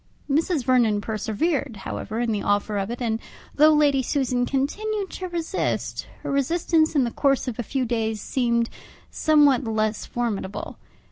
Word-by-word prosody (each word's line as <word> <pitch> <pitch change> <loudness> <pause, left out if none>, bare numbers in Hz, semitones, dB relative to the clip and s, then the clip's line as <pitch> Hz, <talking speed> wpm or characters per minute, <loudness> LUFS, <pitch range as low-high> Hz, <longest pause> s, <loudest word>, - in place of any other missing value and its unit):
Mrs. 310 +1 +1
Vernon 240 -5 +3
persevered, 220 - -1
however, 220 +2 -4
in 240 -1 0
the 210 -2 -1
offer 205 0 0
of 195 +1 -3
it, 240 +1 -4
and 225 -1 0 0.3
though 305 +2 +6
Lady 290 -3 +4
Susan 250 -2 0
continued 400 +9 -1
to 370 - -5
resist, 345 +1 -2 0.2
her - - -3
resistance 315 +3 +2
in 280 - +4
the 235 - -1
course 275 0 +1
of 245 -2 -4
a - - +2
few 255 +3 -2
days 225 -2 -1
seemed 235 0 0 0.4
somewhat 290 -4 +4
less 215 -2 -1
formidable. 220 -5 -3
250 Hz, 155 wpm, -24 LUFS, 225-295 Hz, 0.4 s, though